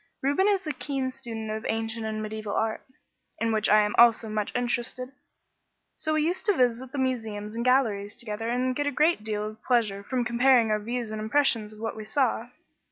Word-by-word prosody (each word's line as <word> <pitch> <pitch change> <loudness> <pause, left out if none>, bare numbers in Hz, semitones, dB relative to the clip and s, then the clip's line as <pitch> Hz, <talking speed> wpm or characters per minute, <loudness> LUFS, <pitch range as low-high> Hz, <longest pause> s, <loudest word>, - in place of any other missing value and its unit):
Reuben 285 +9 +2
is 395 -3 +1
a 305 - -1
keen 270 -2 -3
student 225 -4 -6
of 220 0 -4
ancient 225 0 -2
and 215 0 -3
mediaeval 215 -1 -4
art, 220 0 -1 0.6
in 230 0 0
which 215 -1 +1
I 210 0 +5
also 235 -1 +6
am 215 - -6
much 210 -1 -1
interested, 245 +1 -2 0.8
so 310 0 -1
we 310 - +2
used 350 +4 -1
to 410 - +3
visit 250 0 +1
the 285 - -6
museums 220 -5 -2
and 235 +1 -3
galleries 225 -6 +2
together 225 -1 -4
and 250 +1 0
get 290 +1 -1
a - - +1
great 305 -2 +2
deal 210 -1 -2
of 215 0 -8
pleasure 220 -6 +1
from 245 +4 -2
comparing 240 -1 +4
our 215 - +2
views 235 +1 -3
and 215 0 -4
impressions 220 -2 +2
of 215 - -13
what 225 0 -3
we 215 -1 -7
saw. 240 0 0
230 Hz, 205 wpm, -27 LUFS, 215-260 Hz, 0.8 s, also